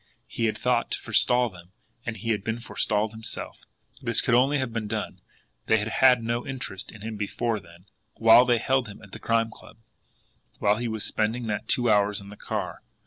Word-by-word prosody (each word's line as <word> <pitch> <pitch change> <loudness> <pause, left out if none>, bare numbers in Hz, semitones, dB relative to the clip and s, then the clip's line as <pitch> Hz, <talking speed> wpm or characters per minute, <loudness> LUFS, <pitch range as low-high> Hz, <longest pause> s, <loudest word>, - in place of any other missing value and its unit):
He 115 - -2
had 110 - 0
thought - - +1
to - - -2
forestall 125 -2 +3
them 90 +1 -15 0.3
and 115 -1 -3
he 115 +3 -5
had 105 -3 0
been 115 +2 -2
forestalled 110 -2 -1
himself! 110 0 -6 0.4
This - - +3
could - - +3
only 135 +4 +4
have 130 -4 -2
been 110 -2 -3
done 110 0 -4 0.5
they 110 - +5
had 105 +1 -2
had 125 0 +5
no 120 +1 -1
interest 125 -8 -6
in 110 - -13
him 110 0 -5
before 110 +2 -1
then 85 -1 -17 0.3
while 115 +2 +7
they 120 -1 +3
held 130 +1 +1
him 105 +1 -11
at 100 - -14
the - - -9
Crime 115 -1 +1
Club, - - -15 0.8
while 105 +1 +2
he 120 +1 -2
was 110 -2 -2
spending 110 +3 0
that 105 -2 -3
two 120 -3 +1
hours 105 -1 +3
in 100 0 -12
the 105 - -10
car! - - -4
110 Hz, 205 wpm, -26 LUFS, 105-120 Hz, 0.8 s, while